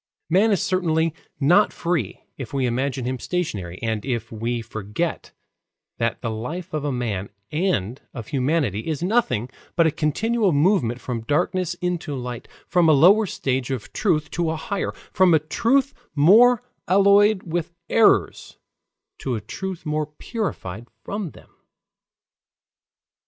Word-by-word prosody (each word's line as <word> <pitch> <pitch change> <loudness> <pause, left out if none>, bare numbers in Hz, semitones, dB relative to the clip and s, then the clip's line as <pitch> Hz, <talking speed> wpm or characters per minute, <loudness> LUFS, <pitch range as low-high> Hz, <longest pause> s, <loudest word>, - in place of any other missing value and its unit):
Man 200 +6 +4
is 200 -2 +2
certainly 165 -5 +1 0.3
not 175 +9 +4
free 170 - -2
if - - -8
we 135 -2 +1
imagine 130 +1 -1
him 130 0 -2
stationary, 100 - -3
and 110 -2 -1
if 125 -4 -3
we 115 +2 -2
forget 110 +8 -4 0.7
that 115 0 -1
the 115 - -1
life 160 +12 -5
of 155 -2 -2
a 145 - -1
man 110 -6 -3 0.2
and 135 - -1
of 120 -4 -8
humanity 135 - 0
is 160 0 -2
nothing 180 - +1 0.3
but 170 - +4
a 160 - +3
continual 205 +7 +1
movement 145 - +2
from 120 -3 -4
darkness 175 - 0
into 175 -5 -2
light, 125 -2 -6 0.2
from 175 -3 +3
a - - +7
lower 195 +9 +6
stage 130 -6 -2
of 130 -5 -5
truth 160 -8 0
to 170 -1 -1
a 160 - -1
higher, 195 +5 -3 0.2
from 185 -3 +5
a - - +4
truth 245 - +1 0.2
more 225 +11 +6 0.2
alloyed 200 +1 +5
with 170 0 -3 0.2
errors 160 - +2 0.6
to 130 -3 -2
a - - -2
truth 175 - -6
more 150 0 -1
purified 150 - -5 0.2
from 200 -3 -4
them. - - -17
155 Hz, 145 wpm, -23 LUFS, 125-185 Hz, 0.7 s, a